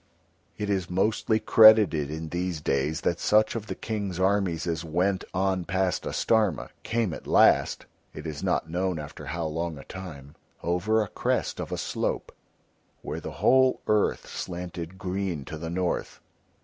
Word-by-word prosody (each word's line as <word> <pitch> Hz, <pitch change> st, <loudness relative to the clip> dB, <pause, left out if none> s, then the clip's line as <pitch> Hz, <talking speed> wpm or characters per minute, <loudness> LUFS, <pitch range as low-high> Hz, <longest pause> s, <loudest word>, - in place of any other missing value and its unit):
It 105 Hz, -, -3 dB
is 95 Hz, -3 st, -1 dB
mostly 110 Hz, +4 st, +1 dB
credited 110 Hz, -12 st, +6 dB
in 80 Hz, +1 st, -5 dB
these 90 Hz, 0 st, -2 dB
days 75 Hz, +1 st, 0 dB
that 85 Hz, -, 0 dB
such 110 Hz, +1 st, +3 dB
of 110 Hz, -2 st, -5 dB
the -, -, -4 dB
King's 100 Hz, -5 st, -4 dB
armies 95 Hz, -3 st, +1 dB
as 85 Hz, -1 st, -2 dB
went 90 Hz, +4 st, 0 dB
on 95 Hz, -1 st, 0 dB
past 95 Hz, +1 st, -1 dB
Astarma 110 Hz, -8 st, +1 dB
came 115 Hz, -6 st, -1 dB
at -, -, -9 dB
last -, -, +4 dB, 0.3 s
(it 75 Hz, -, -9 dB
is 75 Hz, -2 st, -5 dB
not -, -, 0 dB
known 90 Hz, +1 st, -1 dB
after 75 Hz, 0 st, -8 dB
how 85 Hz, 0 st, -3 dB
long 80 Hz, 0 st, -3 dB
a 70 Hz, -, -10 dB
time) 75 Hz, -7 st, -9 dB, 0.3 s
over 95 Hz, +6 st, +1 dB
a -, -, -6 dB
crest -, -, -1 dB
of -, -, -5 dB
a -, -, -2 dB
slope -, -, -2 dB, 0.7 s
where -, -, -4 dB
the -, -, -7 dB
whole 130 Hz, 0 st, +5 dB
earth 105 Hz, -1 st, +1 dB
slanted 90 Hz, 0 st, -6 dB
green 95 Hz, -6 st, -3 dB
to 80 Hz, -, -6 dB
the 80 Hz, +1 st, -5 dB
north. 90 Hz, +1 st, -2 dB
90 Hz, 160 wpm, -27 LUFS, 80-100 Hz, 0.7 s, credited